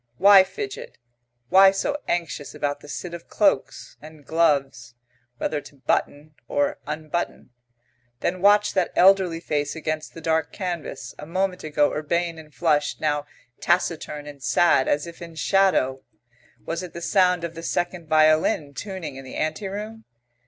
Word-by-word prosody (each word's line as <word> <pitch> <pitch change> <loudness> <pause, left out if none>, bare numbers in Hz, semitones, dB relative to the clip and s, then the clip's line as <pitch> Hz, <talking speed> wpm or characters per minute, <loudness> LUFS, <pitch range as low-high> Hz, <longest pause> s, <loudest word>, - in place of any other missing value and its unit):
Why 195 0 +8
fidget? 420 - -7 0.5
Why 195 +3 +8
so 195 +9 -1
anxious 170 -4 -3
about 145 0 -2
the - - -14
sit 170 +4 -6
of 170 -1 -9
cloaks; 195 -10 0
and 155 -1 -13
gloves 140 -7 0 0.4
whether 150 +4 -2
to 145 0 -15
button 145 +3 -2
or 145 +3 0
unbutton? 155 -2 -4 0.7
Then 180 +1 -1
watch 205 +1 +4
that 185 -3 +1
elderly 185 -3 +5
face 150 -3 -2
against 155 -1 -4
the - - -7
dark 160 -1 0
canvas, 180 -5 -5
a 150 - -8
moment 185 +1 -1
ago 150 -1 +1
urbane 165 +2 -1
and 155 -1 -14
flushed; 150 -3 0
now 150 -1 -1 0.3
taciturn 165 -4 -1
and 145 -2 -11
sad, 150 -2 +3
as 145 - +1
if 170 0 -11
in 170 -1 -9
shadow. 155 -7 +2 0.6
Was 165 +1 -3
it 180 -2 -8
the 170 - -7
sound 180 -3 +3
of 170 -1 -4
the 165 - -8
second 175 0 -2
violin 155 -2 +3
tuning 185 -6 -6
in 135 - -9
the 130 - -10
ante 155 +6 -2
room? 215 +3 -7
165 Hz, 155 wpm, -24 LUFS, 150-185 Hz, 0.7 s, Why